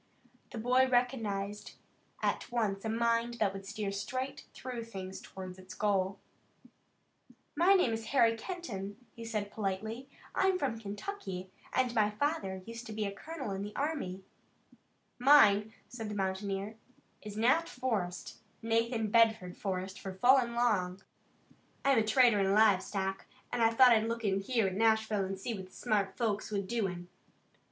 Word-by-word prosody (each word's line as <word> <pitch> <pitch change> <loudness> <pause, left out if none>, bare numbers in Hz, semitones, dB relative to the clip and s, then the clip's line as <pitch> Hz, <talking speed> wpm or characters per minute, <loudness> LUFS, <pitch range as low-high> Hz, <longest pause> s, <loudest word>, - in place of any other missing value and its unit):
The 245 - -8
boy 250 +3 +3
recognized 220 -5 -1 0.5
at - - -1
once 210 -5 0
a 220 - -2
mind 230 +1 +1
that 210 -4 +1
would 195 0 -8
steer 205 -1 -3
straight 255 +7 -4
through 245 -3 -6
things 190 -4 -7
toward 185 -1 -9
its 185 +2 -11
goal. 195 -2 +1 1.4
"My 355 +6 +5
name 265 -12 +3
is 225 0 -4
Harry 235 -4 +4
Kenton," 220 - -6 0.2
he 230 - -8
said 215 -3 -3
politely. 220 +5 -4 0.2
"I'm 380 -1 +2
from 255 -9 -2
Kentucky, 200 - -6 0.2
and 255 -2 +1
my 215 -3 +3
father 210 -6 -2
used 230 +1 -8
to 220 - -6
be 215 0 -2
a 200 - -2
colonel 280 +2 -6
in 195 0 -3
the 205 +1 -6
army." 275 -11 -2 1.0
"Mine," 220 -6 +6 0.2
said 225 -4 -6
the 210 - -4
mountaineer, 195 +2 -2 0.4
"is 210 -1 -8
Nat 260 +9 +3
Forrest, 215 -9 -3 0.2
Nathan 225 -1 0
Bedford 220 -6 +3
Forrest 190 -1 -4
for 190 -1 -6
full 255 +8 +6
and 235 -2 -2
long. 195 -6 +1 0.8
I'm 275 -4 +5
a - - +3
trader 220 0 +5
in 195 0 +2
live 210 -3 +5
stock, 195 -1 -3 0.3
an' 240 - 0
I 225 - +6
thought 250 +2 +7
I'd 220 -1 +4
look 230 -1 -3
in 195 -1 +2
here 225 +2 +1
at 190 - 0
Nashville 220 -1 +2
an' 195 0 -4
see 230 +5 -4
what 190 -3 -7
the - - -23
smart 205 -5 -1
folks 215 -3 -1
was 200 -2 -1
doin'. 190 -5 -2
220 Hz, 160 wpm, -32 LUFS, 195-240 Hz, 1.4 s, thought